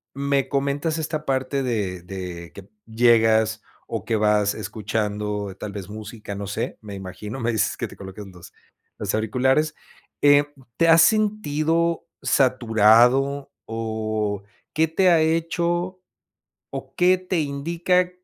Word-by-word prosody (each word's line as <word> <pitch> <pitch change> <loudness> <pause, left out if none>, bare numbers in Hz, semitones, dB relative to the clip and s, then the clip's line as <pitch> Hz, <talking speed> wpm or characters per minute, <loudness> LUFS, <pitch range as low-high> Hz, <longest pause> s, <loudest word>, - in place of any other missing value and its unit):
me 140 -1 0
comentas 140 +3 -1
esta 155 -1 -3
parte 135 +1 -1
de 105 -8 -2
de 90 -2 -7
que 100 -1 -12 0.2
llegas, 110 -1 +3 0.2
o - - -5
que 115 - 0
vas 105 -1 +2
escuchando 105 -1 -3
tal 105 - -5
vez 100 -2 -7
música, 105 0 -8
no 100 0 -5
sé, 100 - -4
me 105 -2 -8
imagino, 95 +5 -7
me 120 -1 0
dices 110 - 0
que - - -3
te - - -13
colocas 95 +1 -9
los 90 -3 -14 0.4
los 100 -2 -3
auriculares, 130 +8 +1 0.5
eh, 145 0 +6 0.3
¿te 165 - +3
has 165 0 +7
sentido 170 -6 +1 0.2
saturado? 125 +2 +3
O, 110 -2 -2 0.3
¿qué 160 +1 +2
te 185 +3 +3
ha 165 -2 +5
hecho 170 +3 0 0.8
o - - -8
qué 180 +1 +4
te 185 -1 -2
indica, 170 +5 0
120 Hz, 135 wpm, -23 LUFS, 105-155 Hz, 0.8 s, has